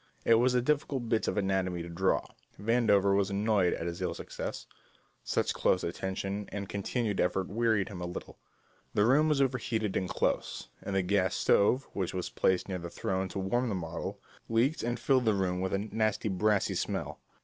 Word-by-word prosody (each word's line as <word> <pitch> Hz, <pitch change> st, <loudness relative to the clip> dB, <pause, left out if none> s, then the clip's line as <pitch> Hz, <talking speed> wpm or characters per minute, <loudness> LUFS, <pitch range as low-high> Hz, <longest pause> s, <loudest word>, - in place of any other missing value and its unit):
It 115 Hz, -, +6 dB
was 125 Hz, +1 st, +3 dB
a 125 Hz, -, +3 dB
difficult 140 Hz, -4 st, 0 dB
bit 115 Hz, -1 st, +1 dB
of -, -, -1 dB
anatomy 95 Hz, -3 st, 0 dB
to -, -, -7 dB
draw. 85 Hz, +3 st, +1 dB, 0.3 s
Vandover 105 Hz, -3 st, +3 dB
was 100 Hz, 0 st, +2 dB
annoyed 100 Hz, -2 st, +2 dB
at 80 Hz, -, -5 dB
his 85 Hz, +1 st, -4 dB
ill 90 Hz, -2 st, -1 dB
success -, -, -6 dB, 0.6 s
such -, -, 0 dB
close 90 Hz, -, +2 dB
attention 95 Hz, +3 st, -3 dB
and 100 Hz, -1 st, -4 dB
continued 105 Hz, +1 st, -2 dB
effort 95 Hz, +1 st, +1 dB
wearied 110 Hz, -1 st, +1 dB
him 95 Hz, -4 st, -7 dB
a 90 Hz, -, -3 dB
little 90 Hz, -, -8 dB, 0.6 s
the 105 Hz, -, +4 dB
room 145 Hz, +6 st, +4 dB
was 140 Hz, -2 st, +3 dB
overheated 115 Hz, -5 st, -1 dB
and 95 Hz, -, -1 dB
close, -, -, -1 dB
and 100 Hz, -, -4 dB
the 95 Hz, -, +2 dB
gas 95 Hz, 0 st, +1 dB
stove, 125 Hz, +6 st, +3 dB
which 95 Hz, -2 st, -2 dB
was 90 Hz, -, -3 dB
placed 95 Hz, -1 st, +1 dB
near 95 Hz, -2 st, -3 dB
the 85 Hz, 0 st, -6 dB
throne 95 Hz, +2 st, -2 dB
to -, -, -6 dB
warm 120 Hz, +6 st, 0 dB
the 100 Hz, -, -1 dB
model, 85 Hz, -3 st, -5 dB, 0.3 s
leaked 120 Hz, +7 st, +2 dB
and 120 Hz, 0 st, -2 dB
filled 130 Hz, 0 st, +2 dB
the 110 Hz, -2 st, +3 dB
room 90 Hz, -2 st, 0 dB
with 95 Hz, -, -1 dB
a -, -, +1 dB
nasty 110 Hz, +1 st, -1 dB
brassy 105 Hz, +1 st, +2 dB
smell. -, -, -3 dB
100 Hz, 195 wpm, -30 LUFS, 95-115 Hz, 0.6 s, It